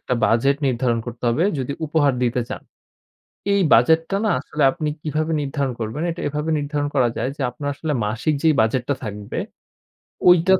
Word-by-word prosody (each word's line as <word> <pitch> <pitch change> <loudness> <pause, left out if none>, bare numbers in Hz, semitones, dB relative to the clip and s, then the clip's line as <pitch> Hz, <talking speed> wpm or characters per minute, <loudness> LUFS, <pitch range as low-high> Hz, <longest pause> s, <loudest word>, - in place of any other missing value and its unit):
একটা 125 - -1
বাজেট 135 +5 +3
নির্ধারণ 120 -2 +1
করতে 120 +1 -7
হবে 135 +9 +2
যদি 130 +2 -2
উপহার 145 -2 +2
দিতে 125 0 +1
চান। - - -6 0.9
এই 200 - +3
বাজেটটা 160 +9 +3
না 215 - +2
আসলে 150 +1 -3
আপনি 155 -3 -3
কিভাবে 155 +1 -1
নির্ধারণ 140 -2 -2
করবেন? 115 +8 -3
এটা 165 - -6
এভাবে 150 +2 -2
নির্ধারণ 145 0 -2
করা 125 -4 +3
যায় 125 +3 -1
যে 140 - -4
আপনার 145 +4 -5
আসলে 150 +1 -3
মাসিক 120 +8 0
যেই 160 -2 +4
বাজেটটা 125 +5 +1
থাকবে 105 -1 -5 0.9
ঐটার 180 +2 +5
140 Hz, 170 wpm, -22 LUFS, 120-155 Hz, 0.9 s, ঐটার